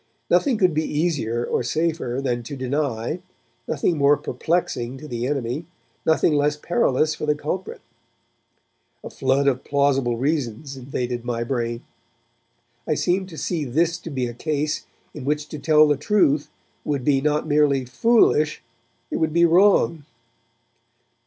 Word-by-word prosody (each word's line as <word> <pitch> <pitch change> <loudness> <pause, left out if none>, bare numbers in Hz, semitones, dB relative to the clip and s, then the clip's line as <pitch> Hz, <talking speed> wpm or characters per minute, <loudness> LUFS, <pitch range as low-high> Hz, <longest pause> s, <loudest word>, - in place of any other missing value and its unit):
Nothing 270 -6 +3
could 185 -5 +3
be 155 +1 +1
easier 145 -8 -1
or - - 0
safer 155 -1 -1
than 120 -2 -1
to 120 +5 -7
deny, 130 +2 -2 0.5
nothing 155 +1 0
more 140 +1 +5
perplexing 130 -3 -2
to 150 - -10
the 120 -2 -3
enemy, 140 +2 -2 0.4
nothing 160 0 +3
less 145 0 +1
perilous 155 - +1
for 150 - -5
the 150 - +3
culprit. 155 +6 -5 1.2
A - - -8
flood 135 +1 +1
of 130 -1 +1
plausible 135 -4 +1
reasons 135 -1 -2
invaded 125 -2 -4
my 120 -1 -2
brain; 120 -1 -3 1.0
I - - +1
seemed 185 +1 0
to 160 - -10
see 165 -2 -2
this 160 +6 0
to - - -8
be 130 -4 -2
a 120 - -5
case 150 +3 -2 0.3
in 150 - -8
which 150 +2 -1
to 155 - -6
tell 155 +1 +5
the 145 -1 +2
truth 150 -6 +2 0.3
would 140 -4 -2
be 140 -2 +3
not 150 +1 +1
merely 145 -3 +2
foolish, 155 - +2 0.5
it - - -1
would 160 -1 0
be 170 +1 +5
wrong. 170 -3 +4
145 Hz, 150 wpm, -23 LUFS, 130-155 Hz, 1.2 s, more